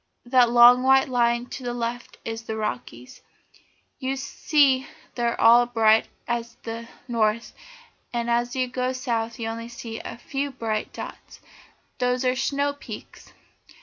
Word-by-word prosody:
That 245 -1 +4
long 240 +1 +8
white 265 +1 +5
line 240 -1 +2
to - - -6
the 245 0 -3
left 240 0 -4
is 225 0 -4
the 220 -1 -5
Rockies. 125 - -5 0.8
You 265 0 -2
see 275 -1 +2 0.3
they're 235 -1 -1
all 240 +1 +6
bright 225 -2 +4 0.2
at 235 0 -3
the 230 0 -6 0.2
north, 230 -1 0 0.6
and 235 -1 -2
as 240 +1 0
you 255 -1 0
go 255 +1 -2
south 230 -3 -2
you 230 -2 -4
only 230 +1 -5
see 230 -1 -7
a - - -8
few 275 +3 -3
bright 225 -5 -3
dots. - - -9 0.6
Those 250 +1 +1
are 255 - +4
the - - -3
snow 280 +2 0
peaks. 285 - -11
240 Hz, 150 wpm, -25 LUFS, 230-255 Hz, 0.8 s, long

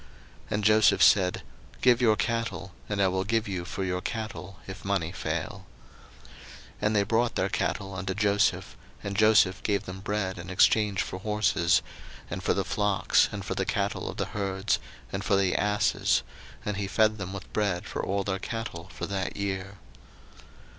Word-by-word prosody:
01:047:016 - - -25
And 105 - -1
Joseph 110 +1 +5
said, 95 -4 +4 0.4
Give 125 -1 +4
your 110 -3 +5
cattle; 115 -3 -2 0.2
and 100 -1 -2
I 100 - +4
will 95 0 0
give 115 +2 0
you 90 -3 -3
for 95 - -4
your 90 -1 -1
cattle, 95 -6 -5
if 95 0 -8
money 95 -4 -1
fail. 85 +2 -4 0.5
01:047:017 - - -19 0.5
And 105 +1 +1
they 100 - +4
brought 115 +3 +1
their - - +1
cattle 95 0 -2
unto 95 0 -3
Joseph: 100 -1 +1 0.3
and 100 -1 -4
Joseph 105 -3 +4
gave 100 -2 0
them 95 +1 -7
bread 100 -2 -2
in 85 +2 -8
exchange 100 +1 +3
for 95 - -6
horses, 95 -4 +2 0.5
and - - -3
for - - +1
the - - 0
flocks, 105 -2 +2
and - - -5
for - - -2
the - - -1
cattle - - -1
of - - -7
the - - 0
herds, 95 -1 0 0.3
and 95 0 -2
for 100 - +2
the 95 -1 +2
asses: 105 +1 +2 0.4
and 105 -1 -2
he 100 -1 -2
fed 110 +1 +2
them 95 -1 -4
with 100 0 -8
bread 100 -5 0
for - - -4
all 100 +1 0
their 95 -1 -2
cattle 110 -7 -5
for - - -5
that 95 -1 -3
year. 100 0 -3
100 Hz, 180 wpm, -28 LUFS, 95-105 Hz, 0.5 s, Joseph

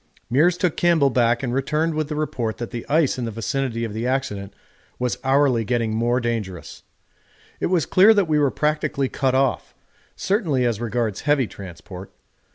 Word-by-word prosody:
Meares 170 +6 +4
took 180 -3 0
Campbell 165 -6 +3
back 120 0 +2
and 125 -2 -2
returned 150 +5 0
with 155 -1 -2
the 150 - -3
report 125 -7 -2
that 120 - -6
the 120 -1 -6
ice 150 -3 +2
in 120 - -2
the - - -3
vicinity 115 +2 -3
of 110 -3 -4
the 115 +3 -3
accident 105 -7 -2 0.5
was 125 -1 -2
hourly 135 -3 +3
getting 115 -1 -1
more 120 +2 +1
dangerous. 110 -7 -4 0.8
It - - 0
was 175 -6 +1
clear 195 - +6
that 200 -4 +2
we 155 -1 +2
were 145 -2 +3
practically 150 -2 -1
cut 130 -2 0
off, 135 -2 0 0.4
certainly 165 - 0
as 115 -2 -1
regards 115 -3 -2
heavy 145 -3 +2
transport. 95 -1 -10
130 Hz, 175 wpm, -22 LUFS, 115-150 Hz, 0.8 s, clear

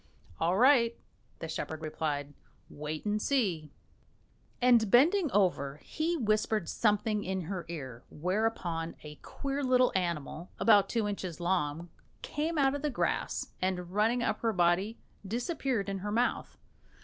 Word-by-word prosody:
"All 175 +3 +2
right," 240 -1 +5 0.4
the - - -6
shepherd 160 0 -5
replied, 145 -2 -3 0.4
"wait 150 +3 -5
and 210 0 0
see." 190 - 0 0.9
And 240 -4 +5
bending 310 - +4
over 180 -9 +2
her, 150 - -20
he 330 +2 -1
whispered 215 - +1
something 210 -1 +1
in 190 -1 -2
her 180 +1 -5
ear, 130 -8 -7
whereupon 175 -2 -2
a 150 -1 -9
queer 280 0 -4
little 255 -1 +4
animal 170 -2 -2
about 205 -3 +5
two 225 -3 0
inches 185 -5 -4
long 170 -2 -1 0.3
came 315 +2 -2
out 270 -2 +3
of 285 - -3
the 300 - 0
grass, 255 - -1
and 180 -1 -1
running 225 +5 +2
up - - 0
her 225 -1 0
body, 185 +4 +2 0.3
disappeared 240 - -2
in 195 -1 -3
her 205 +2 -4
mouth. 240 +3 0
205 Hz, 145 wpm, -31 LUFS, 170-240 Hz, 0.9 s, right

